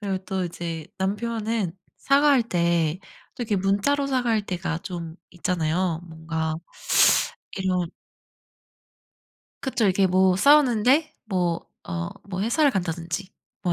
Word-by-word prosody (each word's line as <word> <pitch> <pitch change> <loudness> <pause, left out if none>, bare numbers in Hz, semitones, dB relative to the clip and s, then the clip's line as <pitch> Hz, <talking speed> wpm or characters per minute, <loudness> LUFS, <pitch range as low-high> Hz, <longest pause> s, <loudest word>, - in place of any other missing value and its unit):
그리고 195 -2 -2
또 190 -2 -2
이제 165 -2 -5
남편은 215 0 -1 0.3
사과할 280 -2 +4
때 170 -4 +1 0.4
또 250 - -5
이렇게 215 -2 -1
문자로 205 +10 +1
사과할 240 -5 +1
때가 175 -3 -3
좀 170 -2 -6 0.2
있잖아요. 175 -1 -1
뭔가 160 -1 -3 1.0
이런 185 -2 0 1.7
그쵸. 255 -4 0
이렇게 195 0 +3
뭐 185 0 +3
싸우는데 280 - +4
뭐 180 -5 -1 0.2
어 85 0 -3 0.2
뭐 185 -1 -3
회사를 285 +6 +3
간다든지 175 -1 -3 0.3
뭐 180 - +1
190 Hz, 240 characters per minute, -25 LUFS, 170-230 Hz, 1.7 s, 사과할